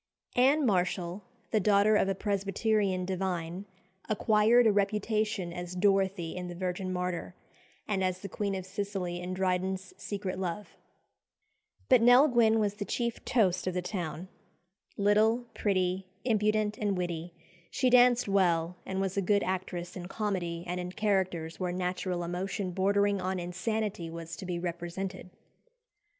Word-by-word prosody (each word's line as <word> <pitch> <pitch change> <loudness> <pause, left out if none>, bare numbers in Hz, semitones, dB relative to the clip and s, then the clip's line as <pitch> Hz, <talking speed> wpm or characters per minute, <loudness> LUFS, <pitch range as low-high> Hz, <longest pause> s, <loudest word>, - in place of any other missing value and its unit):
Anne 275 +4 +4
Marshall, 185 -2 0 0.3
the 220 - +3
daughter 205 +1 +4
of 195 - +3
a 195 - 0
Presbyterian 200 -1 0
divine, 180 -1 -3 0.4
acquired 220 +3 +4
a 220 - +6
reputation 210 -2 0
as 175 0 -6
Dorothea 195 -3 +1
in 180 - -5
"The 175 - -7
Virgin 185 +1 -3
Martyr," 180 0 -3 0.5
and 195 -3 0
as 185 0 -1
the 200 - -5
Queen 200 +1 -2
of 190 -1 -5
Sicily 190 -2 -3
in 180 +1 -4
Dryden's 185 0 -1
"Secret 190 -2 -4
Love." 190 +2 -4 1.1
But 255 -3 +6
Nell 245 +5 +7
Gwynn 230 -4 +4
was 205 -2 +1
the 205 0 -5
chief 235 +2 -2
"toast" 185 -7 +2
of 185 - -1
the 180 - -1
town. 180 -2 -4 0.7
Little, 215 +4 +3
pretty, 185 -2 0 0.2
impudent, 215 -2 +1
and 205 -3 0
witty, 175 -1 -4 0.3
she 255 - +1
danced 245 -1 +5
well, 180 -3 +2
and 190 0 -2
was 195 0 -2
a - - +3
good 200 +2 +2
actress 180 -1 -3
in 180 -2 -6
comedy 180 -5 -2
and 180 0 -3
in 180 0 -5
characters 185 -6 -1
where 180 -1 -1
"natural 180 0 -2
emotion 185 +2 -3
bordering 200 +2 +2
on 185 0 -1
insanity" 180 0 -2
was 165 0 -7
to 190 - -7
be 175 -1 -2
represented. 175 +2 -5
190 Hz, 150 wpm, -30 LUFS, 180-210 Hz, 1.1 s, Nell